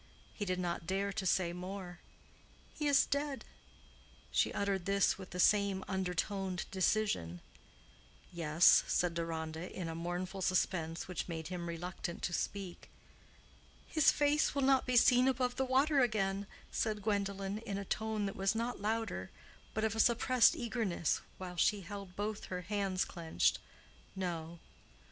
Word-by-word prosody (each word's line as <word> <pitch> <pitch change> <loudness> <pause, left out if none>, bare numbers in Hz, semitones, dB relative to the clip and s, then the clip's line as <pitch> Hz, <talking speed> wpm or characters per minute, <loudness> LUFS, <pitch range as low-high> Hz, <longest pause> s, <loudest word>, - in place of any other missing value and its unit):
He 205 - -4
did 185 -1 -1
not 170 -2 -3
dare 195 +2 -1
to 195 -2 -2
say 175 -1 +2
more. 180 0 -7 0.7
"He 300 - -2
is 280 -1 +5
dead." 285 -1 -2 0.9
She - - +2
uttered 200 -3 -1
this 200 0 +2
with 190 - -9
the 180 - -6
same 200 0 +3
undertoned 190 0 -2
decision. 185 - 0 0.9
"Yes," 165 0 +5
said 180 -1 +1
Deronda, 165 0 -4
in 180 -3 -5
a 165 - -4
mournful 175 +3 -4
suspense 170 -3 0
which 180 - -4
made 160 -2 -5
him 175 -2 -4
reluctant 170 0 -5
to 175 - -1
speak. 190 -1 -4 1.0
"His 310 -3 +4
face 295 +1 +2
will 280 - +1
not 265 -1 +3
be 250 -1 +3
seen 250 +2 +6
above 250 -1 +1
the 265 - +1
water 275 +3 +3
again," 200 -5 +1 0.2
said 215 -2 -1
Gwendolen, 200 -1 -1
in 215 -3 -4
a 200 - -4
tone 220 +1 -1
that 195 - -3
was 195 +2 +1
not 235 +1 -2
louder, 225 +2 -2 0.5
but 220 - 0
of 220 -1 0
a - - -3
suppressed 240 +2 +5
eagerness, 225 -9 -1 0.2
while 180 -1 -7
she 205 +3 +3
held 195 0 -8
both 210 +1 -3
her 180 -1 -4
hands 195 0 -1
clenched. 165 -2 0 0.6
"No." 170 -3 -4
195 Hz, 150 wpm, -34 LUFS, 180-220 Hz, 1.0 s, seen